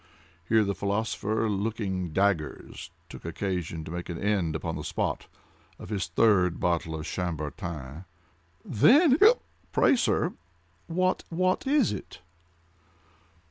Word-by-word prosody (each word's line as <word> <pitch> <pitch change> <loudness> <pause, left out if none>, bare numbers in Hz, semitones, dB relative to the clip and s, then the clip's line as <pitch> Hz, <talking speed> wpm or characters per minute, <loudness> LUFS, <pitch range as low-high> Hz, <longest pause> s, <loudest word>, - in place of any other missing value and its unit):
(Here 110 -1 +5
the 100 -1 -1
philosopher, 110 +2 -1
looking 100 -3 -2
daggers, 95 -3 -1 0.2
took - - -11
occasion 85 -1 -3
to 80 - -8
make 90 +1 -5
an 85 - -4
end, 95 -6 0
upon 80 - -3
the - - -5
spot, - - -2 0.5
of - - -10
his 100 -3 -2
third 95 -6 +3
bottle 85 -2 0
of 80 -1 -5
Chambertin.) 80 -2 -5 0.6
"Then—hic 275 - +5
cup!—pray, 435 - +3
sir—what—what 165 - -1
is 280 -4 +3
it?" 100 - -8
95 Hz, 110 wpm, -27 LUFS, 85-110 Hz, 0.6 s, Here